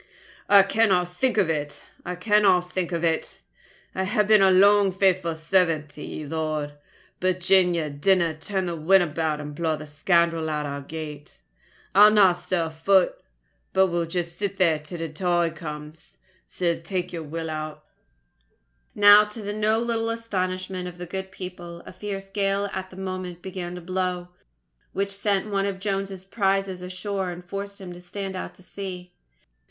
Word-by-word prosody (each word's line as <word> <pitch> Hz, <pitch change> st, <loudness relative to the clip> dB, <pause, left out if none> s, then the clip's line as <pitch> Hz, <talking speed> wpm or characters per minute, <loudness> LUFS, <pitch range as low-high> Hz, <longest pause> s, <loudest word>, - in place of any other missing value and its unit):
"I 200 Hz, -1 st, +8 dB
canna 195 Hz, -3 st, +2 dB
think 220 Hz, +8 st, 0 dB
of 200 Hz, -5 st, +4 dB
it! 150 Hz, -3 st, -3 dB, 0.2 s
I 180 Hz, -, -4 dB
canna 205 Hz, 0 st, +4 dB
think 180 Hz, 0 st, -3 dB
of 170 Hz, -1 st, -2 dB
it! 165 Hz, -1 st, -1 dB, 0.5 s
I 190 Hz, -, -1 dB
hae 210 Hz, +2 st, +2 dB
been 210 Hz, 0 st, +5 dB, 0.2 s
lang 205 Hz, 0 st, +6 dB
a -, -, 0 dB
faithful 185 Hz, -3 st, +1 dB
servant 160 Hz, -2 st, +2 dB
to 150 Hz, -, -12 dB
ye, 155 Hz, -, -6 dB
Lord; 155 Hz, -1 st, -3 dB, 0.5 s
but 185 Hz, 0 st, +1 dB
gin 180 Hz, -1 st, +4 dB
ye 160 Hz, -2 st, -1 dB
dinna 165 Hz, +3 st, +2 dB
turn 190 Hz, +4 st, -3 dB
the 170 Hz, -1 st, -3 dB
wind 175 Hz, +4 st, +4 dB
about 155 Hz, -1 st, -2 dB
and 150 Hz, 0 st, -6 dB
blaw 160 Hz, +1 st, -1 dB
the 155 Hz, 0 st, -8 dB
scoundrel 165 Hz, +1 st, +1 dB
out 150 Hz, -1 st, -2 dB
of 145 Hz, -, -4 dB
our 140 Hz, 0 st, -5 dB
gate, 150 Hz, 0 st, -8 dB, 0.5 s
I'll 210 Hz, +1 st, +9 dB
nae 205 Hz, -4 st, +6 dB
stir 175 Hz, 0 st, -2 dB
a 160 Hz, -, -6 dB
foot. 185 Hz, +4 st, +2 dB, 0.5 s
But 190 Hz, 0 st, +4 dB
will 170 Hz, -1 st, -1 dB
just 170 Hz, 0 st, -3 dB
sit 200 Hz, -1 st, -2 dB
here 165 Hz, -5 st, +3 dB
till 155 Hz, +3 st, -8 dB
the 165 Hz, -1 st, -4 dB
tide 175 Hz, 0 st, 0 dB
comes. 150 Hz, 0 st, -9 dB, 0.3 s
Sae 170 Hz, -2 st, -1 dB
tak 180 Hz, +1 st, -3 dB
ye'r 170 Hz, -, -4 dB
will 160 Hz, +1 st, -5 dB
o't." 155 Hz, -1 st, -5 dB, 1.2 s
Now, 205 Hz, +1 st, +8 dB
to 210 Hz, +2 st, -10 dB
the 205 Hz, +1 st, -3 dB
no 215 Hz, +1 st, +2 dB
little 230 Hz, -1 st, -1 dB
astonishment 185 Hz, -5 st, -3 dB
of 180 Hz, -1 st, -9 dB
the 180 Hz, -, -6 dB
good 190 Hz, +2 st, -5 dB
people, 175 Hz, -2 st, -8 dB
a -, -, -10 dB
fierce 195 Hz, -2 st, -5 dB
gale 195 Hz, 0 st, -1 dB
at 190 Hz, 0 st, -4 dB
that 185 Hz, -, -14 dB
moment 185 Hz, -2 st, -5 dB
began 180 Hz, -2 st, -5 dB
to 180 Hz, -, -7 dB
blow, 180 Hz, 0 st, -2 dB, 0.6 s
which 200 Hz, +1 st, -1 dB
sent 200 Hz, +1 st, -1 dB
one 195 Hz, 0 st, +1 dB
of 195 Hz, -1 st, -4 dB
Jones's 195 Hz, -1 st, -3 dB
prizes 195 Hz, -2 st, 0 dB
ashore 185 Hz, +1 st, -3 dB
and 175 Hz, 0 st, -8 dB
forced 200 Hz, +2 st, -6 dB
him 185 Hz, -2 st, -8 dB
to 175 Hz, -, -12 dB
stand 195 Hz, +1 st, -6 dB
out 185 Hz, -, -6 dB
to 185 Hz, -, -17 dB
sea. 180 Hz, -2 st, -7 dB
180 Hz, 180 wpm, -25 LUFS, 165-195 Hz, 1.2 s, I'll